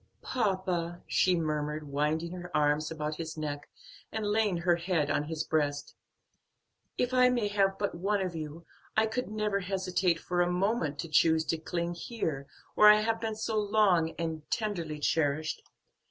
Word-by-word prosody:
"Papa," 185 -7 -1
she 185 -1 +3
murmured, 150 -2 -2
winding 150 +4 -1
her 180 -1 -7
arms 150 +1 +2
about 155 -1 -4
his 165 -1 -5
neck, 145 -2 -4 0.4
and 220 -1 -3
laying 205 -3 +1
her 170 0 +2
head 170 -4 0
on 150 - 0
his 160 0 -3
breast, 145 -3 -1 1.0
"if 250 +1 0
I 250 0 +6
may 240 -4 +1
have 195 -1 +2
but 200 -1 -1
one 200 +4 0
of 185 -3 -3
you, 160 +1 -6 0.3
I 220 - +5
could 250 +3 -2
never 210 -2 0
hesitate 185 -2 0
for 175 +1 -1
a 175 0 +2
moment 180 -5 0
to - - -6
choose 160 +1 +3
to 165 - 0
cling 170 +1 -3
here 165 - -4 0.3
where 210 - +8
I 210 0 +7
have 225 +1 0
been 220 -1 -2
so 220 0 -1
long 200 -6 +2
and 160 -2 -3
tenderly 175 -8 -2
cherished. 150 0 0
175 Hz, 170 wpm, -30 LUFS, 155-205 Hz, 1.0 s, where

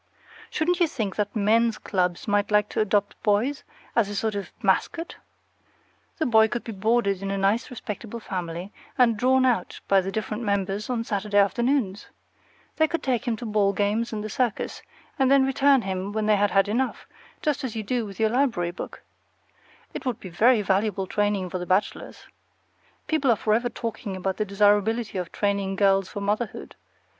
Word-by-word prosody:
Shouldn't 350 +3 0
you 345 - +4
think 220 -10 -3
that 205 +1 -1
men's 225 +2 +3
clubs 180 -2 -1
might 205 0 +1
like 210 -1 +3
to - - -3
adopt 205 -1 0
boys, 225 +7 +1 0.3
as 225 -4 +3
a 205 - -5
sort 220 +2 -1
of 200 -1 -5
mascot? 330 +1 0 1.0
The 315 - 0
boy 220 -2 +5
could 240 +2 -4
be 230 - -6
boarded 200 -1 +1
in 195 - -3
a 195 - -1
nice 200 +5 +1
respectable 230 -1 -6
family, 180 -2 -5 0.2
and 240 -3 +4
drawn 260 +4 +3
out 235 -8 0
by 195 -1 +4
the 190 +1 -4
different 215 +1 -3
members 200 0 -1
on 240 -2 -1
Saturday 205 -2 -1
afternoons. 215 0 +1 0.7
They 315 - +4
could 335 +2 -3
take 255 -1 0
him 235 - +1
to 230 - -8
ball 210 -2 +2
games 210 +4 0
and 215 -2 -4
the 215 - -5
circus, 245 -4 -2 0.4
and 265 -1 +4
then 275 -1 +5
return 270 -1 +3
him 190 +1 -3
when 215 0 -1
they 215 0 +4
had 205 0 +2
had 195 +2 +3
enough, 250 +5 -1 0.4
just 300 -4 0
as 250 -4 -4
you 220 - -3
do 240 +3 -1
with 195 -2 -11
a 220 - +4
library 230 -8 +1
book. 175 - -8 0.9
It - - -6
would 245 -4 -2
be 185 - -9
very 220 +5 +4
valuable 195 0 0
training 205 -2 -1
for 185 - -3
the 180 - -6
bachelors. 190 +2 -1 0.8
People 305 -4 +1
are 235 - +5
forever 225 +3 +1
talking 230 -4 -5
about 190 0 -2
the 215 - 0
desirability 205 +1 +2
of 180 -2 -5
training 200 -1 -1
girls 195 -1 +3
for 205 - -6
motherhood. 210 +3 -3
210 Hz, 185 wpm, -25 LUFS, 195-235 Hz, 1.0 s, boy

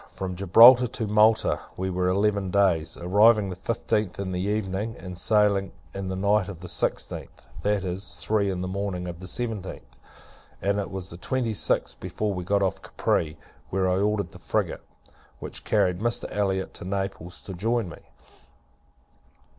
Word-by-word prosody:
From 95 -1 -5
Gibraltar 115 +7 +8
to 115 -1 -4
Malta, 105 +1 +3 0.2
we 95 +1 -2
were 90 0 0
eleven 100 +1 +1
days: 90 -5 +2
arriving 105 +3 +4
the - - -5
fifteenth 105 0 -2
in 95 -1 -3
the 90 0 -2
evening, 105 +2 -2
and 90 -1 -8
sailing 100 0 +2 0.2
in 95 -1 -4
the 95 - -3
night 100 0 +2
of 95 - -7
the 90 +2 -9
sixteenth 80 - -2 0.2
that 105 -1 +1
is, 95 +2 -4
three 105 -2 0
in 90 -2 -2
the 90 - -3
morning 95 -1 -3
of 85 -1 -7
the 95 - -8
seventeenth 110 -3 -5 0.6
and 100 +1 0
it 100 - -3
was 95 -1 -6
the 85 - -8
twenty 120 +3 -1
sixth - - 0
before 95 +3 -2
we 90 -1 -4
got 100 +2 +1
off 95 - -1
Capri; 80 -1 -1 0.3
where 95 0 +1
I 90 - +2
had 95 - +1
ordered 100 -4 0
the - - -13
frigate, - - -1 0.6
which - - -7
carried 90 -1 +2
Mr. 120 +2 -1
Elliot 95 -2 0
to - - -8
Naples, 95 -2 -4
to 95 - -8
join 110 +4 0
me. 85 - -10
95 Hz, 175 wpm, -26 LUFS, 90-105 Hz, 0.6 s, Gibraltar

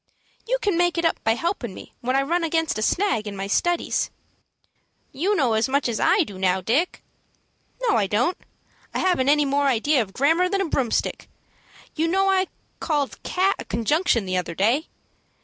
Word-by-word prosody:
"You - - +1
can 395 -5 +1
make 350 0 +2
it 335 - 0
up 330 - 0
by 225 0 +2
helpin' 340 +10 -3
me - - -12
when 255 +1 -1
I 275 - +3
run 340 +5 0
against 325 -6 0
a - - -3
snag, 230 - +1
in 200 - -5
my 195 0 -4
studies." 345 - 0 1.0
"You 380 +9 0
know 260 - +2
as 220 +4 +1
much 280 +1 +1
as 230 -2 -2
I 385 -1 +4
do 200 -10 -10
now, 185 0 +2
Dick." 255 - 0 0.8
"No, 435 - +3
I 200 - +1
don't. 235 - +1 0.6
I - - +1
haven't 350 -8 +2
any 295 0 +4
more 280 +1 +1
ideas 270 +2 +2
of 195 -3 -6
grammar 325 +7 +2
than 395 +1 0
a - - 0
broomstick. 250 -6 -1 0.6
You 325 +1 0
know 385 +3 +2
I 380 -1 +2 0.3
called 295 -4 -2
'cat' 380 +2 +1
a - - -6
conjunction 235 - +1
the 185 0 -1
other 175 -2 -3
day. 235 - +1
285 Hz, 190 wpm, -23 LUFS, 225-350 Hz, 1.0 s, I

